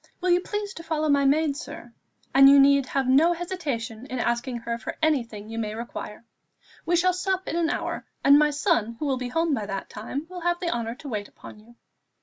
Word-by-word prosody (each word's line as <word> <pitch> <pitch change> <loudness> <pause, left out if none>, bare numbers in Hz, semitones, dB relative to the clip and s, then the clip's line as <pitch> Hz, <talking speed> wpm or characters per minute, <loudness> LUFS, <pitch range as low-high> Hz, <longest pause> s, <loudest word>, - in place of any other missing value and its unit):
Will 365 -1 +1
you 350 - +5
please 415 +1 -4
to - - -9
follow 310 -1 -1
my 280 -1 +3
maid, 290 +1 +2
sir; 290 -4 -9 0.4
and 275 0 +8
you 280 0 +8
need 275 -1 +5
have 270 -1 -1
no 300 +7 +5
hesitation 275 -10 -4
in 255 - -5
asking 240 +1 -1
her 235 0 -4
for 220 - -6
anything 235 -10 -1
you 225 +1 -5
may 215 -1 -3
require. 230 -1 -7 0.6
We 350 - +3
shall 365 +1 +3
sup 375 +1 -2
in - - -2
an 335 -1 +1
hour, - - -3 0.2
and 280 +1 +7
my 300 0 +4
son, 290 - 0
who 300 - -4
will 270 -2 0
be 250 -1 -4
home 325 +3 0
by 215 -6 -2
that 195 -1 -5
time, 260 +8 -5
will 360 0 -8
have 345 0 0
the 345 -2 -2
honour 235 0 -3
to 285 - -11
wait 210 -5 -4
upon - - -13
you." 230 +3 -19
280 Hz, 225 wpm, -25 LUFS, 235-330 Hz, 0.6 s, and